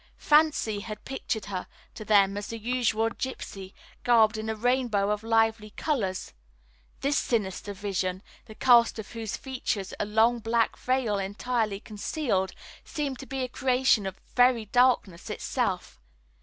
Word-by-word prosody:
Fancy 295 -9 +3
had 215 +1 -8
pictured 245 -5 -3
her 190 -3 -5 0.3
to - - -8
them 200 -2 +4
as 205 0 -4
the 230 - -5
usual 225 -1 0
gypsy, 195 -7 -6 0.3
garbed 225 -2 +5
in 220 0 -4
a 220 - -1
rainbow 230 -3 +1
of 210 0 -1
lively 225 -1 +1
colors. 200 - -2 0.7
This 280 +1 +2
sinister 205 -3 -2
vision, 190 -1 -2 0.2
the 220 - -12
cast 235 -2 +5
of 220 -2 -7
whose 225 -3 -4
features 245 -7 -3
a - - 0
long 220 +3 +3
black 230 0 +1
veil 250 -5 0
entirely 210 +1 -1
concealed, 210 -2 -2 0.3
seemed 280 -4 -4
to 270 - -9
be 270 -1 -3
a - - -1
creation 250 -5 +2
of 190 - -5
the - - -29
very 245 -2 +4
darkness 235 -6 +2
itself. - - -2
225 Hz, 150 wpm, -27 LUFS, 205-250 Hz, 0.7 s, garbed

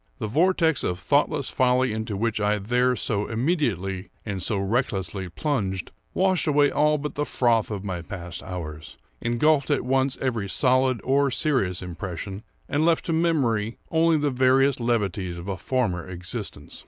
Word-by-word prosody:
The 120 - -3
vortex 160 - +2
of 90 - -1
thoughtless 145 - +1
folly 125 -1 +2
into 110 -2 -3
which 110 0 -1
I 105 +1 +2
there 125 +5 +1
so 105 -4 -1
immediately 110 - -1 0.2
and 100 -3 -3
so 105 +3 -1
recklessly 95 -3 -1
plunged, 95 - -2 0.2
washed 185 -2 +2
away 145 -1 +4
all 150 +1 +3
but 150 +1 -4
the 145 - -1
froth 120 -6 +2
of 100 -3 -4
my 90 -4 -3
past 85 0 -7
hours, 80 -4 -7 0.2
engulfed 140 +5 +2
at 145 -4 +1
once 135 +1 +1
every 115 -7 -1
solid 130 +3 +2
or 140 +1 +3
serious 125 - 0
impression, 90 +2 -6 0.3
and 145 +2 +1
left 165 0 +2
to 165 - -1
memory 130 -10 +1
only 165 0 +4
the 145 -1 0
veriest 130 +1 +3
levities 100 -7 -1
of 85 +2 -8
a 100 - -2
former 95 -7 -1
existence. 90 -1 -7
120 Hz, 160 wpm, -25 LUFS, 95-140 Hz, 0.3 s, away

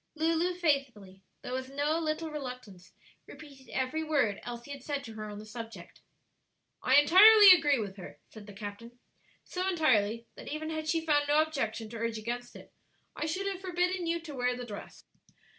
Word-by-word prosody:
Lulu 330 +3 +1
faithfully, 265 - -1 0.2
though 250 - -6
with 260 0 -4
no 290 +4 0
little 315 0 -3
reluctance, 250 -10 -8 0.4
repeated 275 -3 -14
every 265 +5 -2
word 280 -10 0
Elsie 240 +3 -8
had 280 -1 -7
said 285 0 -4
to 225 - -9
her 215 -1 -7
on 205 - -8
the 210 - -9
subject. 225 -5 -10 0.8
"I 260 - +3
entirely 395 +8 +9
agree 300 -6 +5
with 200 -3 -5
her," 185 - -10
said 215 -2 -13
the 205 - -10
captain; 210 +4 -9 0.5
"so 370 +1 -3
entirely 230 - +1
that - - -12
even 315 +1 -4
had 315 0 -4
she 325 0 0
found 290 -2 +2
no 295 +1 +4
objection 230 -8 -3
to 230 - -7
urge 230 0 -2
against 240 +2 -5
it, - - -14 0.4
I 310 - -3
should 370 +5 -2
have 390 -2 -3
forbidden 360 -1 -1
you 335 +1 0
to 320 -3 -9
wear 250 -1 0
the 250 - -6
dress." 210 -3 -10
275 Hz, 185 wpm, -30 LUFS, 230-320 Hz, 0.8 s, entirely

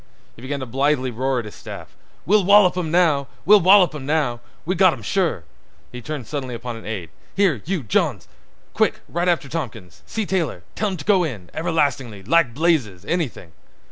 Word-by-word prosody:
He - - -15
began 140 +2 -4
to - - -3
blithely 135 +1 0
roar 130 +3 -1
at 120 - -2
his 105 - -9
staff: - - -10 0.3
"We'll 205 +2 +4
wallop 200 -1 +6
'im 180 -3 -2
now. 155 -5 +2 0.2
We'll 210 +2 +7
wallop 185 -1 +6
'im 150 -3 -7
now. 145 -6 0 0.3
We've 185 +4 -1
got 185 -2 +5
'em - - -9
sure." 175 - 0 0.5
He 125 - -8
turned 150 -1 -5
suddenly 130 -1 -4
upon 120 0 -6
an 115 - -10
aide: 95 -7 -5 0.2
"Here—you—Jones—quick—ride 175 - -1
after 170 -5 0
Tompkins—see 120 - -5
Taylor—tell 185 - -2
him 190 - -4
t' 145 - -9
go 195 -3 +4
in—everlastingly—like 130 - -1
blazes—anything." 140 - -1
145 Hz, 150 wpm, -21 LUFS, 120-175 Hz, 0.5 s, We'll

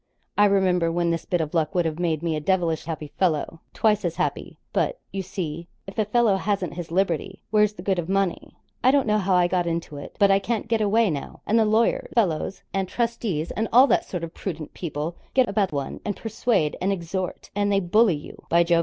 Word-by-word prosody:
I 205 - +5
remember 185 -4 +3
when 170 0 +1
this 165 -1 -2
bit 175 -2 0
of 155 -1 -4
luck 160 -1 0
would 175 -1 +2
have 160 0 -2
made 165 -3 0
me 165 -2 0
a - - -1
devilish 165 0 0
happy 155 -2 -5
fellow 165 -2 0
twice 210 -1 +2
as 170 -2 -1
happy; 180 - -2 0.2
but, - - 0
you 195 - -3
see, 170 -3 -5 0.2
if 195 - -9
a 215 - +3
fellow 215 -2 +3
hasn't 190 -4 -1
his 170 -1 -6
liberty, 190 +1 -1
where's 210 -1 +4
the 175 - -10
good 190 -2 +1
of 170 0 -4
money? 195 -2 -1 0.3
I 255 - +6
don't 275 0 +4
know 215 -1 +2
how 190 -1 +2
I 180 -1 +4
got 175 -1 0
into 165 -3 -3
it, 140 - -9
but 200 -1 +5
I 195 - +5
can't 225 +2 -2
get 225 -1 +1
away 215 -1 +3
now; 140 -2 -6
and 225 +2 +3
the 220 - +4
lawyer 235 - +2
fellows, 190 -5 0
and 195 -1 0
trustees, 225 -9 -1
and 220 +1 -1
all 255 +3 +8
that - - +2
sort 180 -3 -5
of 165 0 -6
prudent 165 -5 -6
people, 160 0 -4 0.2
get 260 -2 +5
about 200 -1 +1
one, 140 -2 -4
and 205 - -2
persuade, 225 -8 0
and 190 +2 +1
exhort, 185 0 -4
and 205 0 +1
they 200 - +3
bully 195 +1 +3
you, 145 - -10
by 170 +1 +5
Jove! 170 0 +3
185 Hz, 230 wpm, -24 LUFS, 165-210 Hz, 0.3 s, all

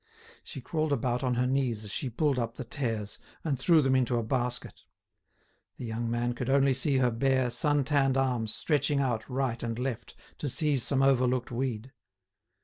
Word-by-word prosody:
She - - -8
crawled 155 -2 -2
about 125 -1 0
on 125 -1 +1
her 125 +1 +1
knees 125 -4 0
as 105 - -7
she 130 - -2
pulled 140 +2 0
up 115 -1 -3
the - - -5
tares 110 -4 -4 0.2
and 140 -6 -1
threw 160 +2 +4
them 135 0 +2
into 125 -2 +2
a 115 - 0
basket. 125 +1 -3 1.0
The - - -6
young 115 +1 -3
man 120 +1 0
could 120 +1 -4
only 135 0 +4
see 135 +2 +1
her 125 -2 +3
bare, 130 +1 +1
sun 145 +3 +3
tanned 135 -1 +2
arms 125 -5 0
stretching 145 -2 +1
out 120 -4 -1
right 130 -2 -1
and 115 -1 -3
left 125 -2 -4 0.2
to 145 - -2
seize 140 +1 +1
some 135 +2 +1
overlooked 130 -2 +2
weed. 125 -1 -3
130 Hz, 185 wpm, -29 LUFS, 120-135 Hz, 1.0 s, threw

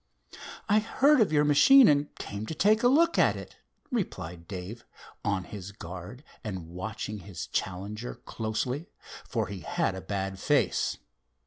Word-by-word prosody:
"I 210 0 +5
heard 265 +5 +4
of 205 - +3
your 150 -1 +4
machine 230 - +7
and 145 0 +2
came 100 +2 -6
to 160 - -4
take 215 +7 +4
a 245 - +5
look 330 +6 +4
at - - +4
it," - - -10 0.3
replied 90 - -4
Dave, 100 +4 -7 0.4
on 95 -2 0
his 100 +1 -8
guard 95 - -9 0.2
and 95 -6 -5
watching 105 +4 -5
his 95 -3 -7
challenger 100 +6 -4
closely, 120 +7 -3 0.4
for - - 0
he 100 -2 -7
had 90 - -1
a 95 - -6
bad 95 0 -3
face. - - +1
105 Hz, 150 wpm, -28 LUFS, 95-155 Hz, 0.4 s, machine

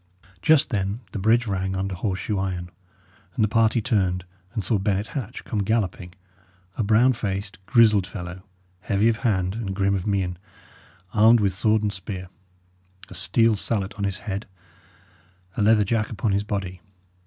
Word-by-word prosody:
Just 155 +5 +4
then 100 +1 -1
the - - -4
bridge 115 +4 +3
rang 95 -2 -2
under 95 0 -2
horse 95 +1 -2
shoe 105 -3 -1
iron, 90 -2 -3 0.6
and - - +2
the - - +4
party 115 +1 +2
turned 95 -7 0 0.3
and 105 - -3
saw 105 +3 +1
Bennet 100 +1 -1
Hatch 125 -2 -5
come 110 - -3
galloping 95 -4 -1 0.6
a - - -2
brown 115 +5 +4
faced, 100 -2 -4
grizzled 110 -6 +5
fellow, 90 -1 -7 0.4
heavy 100 +4 +2
of 115 - 0
hand 95 -7 0
and 105 -4 -4
grim 100 0 +1
of 95 0 -2
mien, 95 -3 -1 0.7
armed 115 +2 +6
with 100 -3 +1
sword 110 +3 +2
and 105 -1 0
spear, 95 -1 -7 0.8
a - - -10
steel 115 +4 +2
salet 100 -1 -1
on 100 0 -5
his 100 -1 -1
head, 100 0 -4 1.1
a - - -1
leather 105 0 +5
jack 110 +1 0
upon 110 -1 -1
his 100 +1 +1
body. 95 -3 -4
100 Hz, 165 wpm, -24 LUFS, 95-110 Hz, 1.1 s, armed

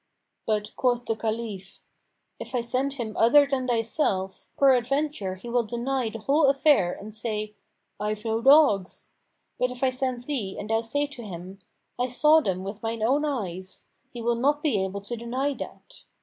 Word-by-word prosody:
But 210 -1 -1
quoth 245 -1 +1
the 225 - 0
Caliph, 220 -4 -4 0.6
"If - - -6
I 245 - +2
send 255 +4 -1
him 235 -6 -5
other 285 +6 +6
than 270 -2 -1
thyself, 225 -5 -1
peradventure 270 -5 +2
he 190 +6 -11
will 240 +1 +2
deny 240 +2 -2
the 225 - -7
whole 275 +6 +3
affair 275 - +4
and 210 +1 -9
say, 215 -1 -4 0.5
'I've 210 +1 -3
no 225 0 0
dogs.' 270 -9 +4 0.5
But 250 - +2
if 250 +1 -7
I 260 - +3
send 255 -1 -2
thee 245 -9 -3
and 210 +2 -5
thou 225 0 +2
say 285 +6 0
to 280 -4 -9
him, 190 -2 -8 0.4
'I 250 - +1
saw 300 +5 +5
them 185 -8 -2
with 200 +2 -6
mine 225 -1 -3
own 280 +6 +2
eyes,' 190 - -4 0.2
he 240 -2 -7
will 235 +1 +2
not 285 +5 +1
be 220 -11 +2
able 195 +1 -4
to 220 +4 -5
deny 255 +5 -2
that. - - -10
235 Hz, 180 wpm, -26 LUFS, 210-270 Hz, 0.6 s, other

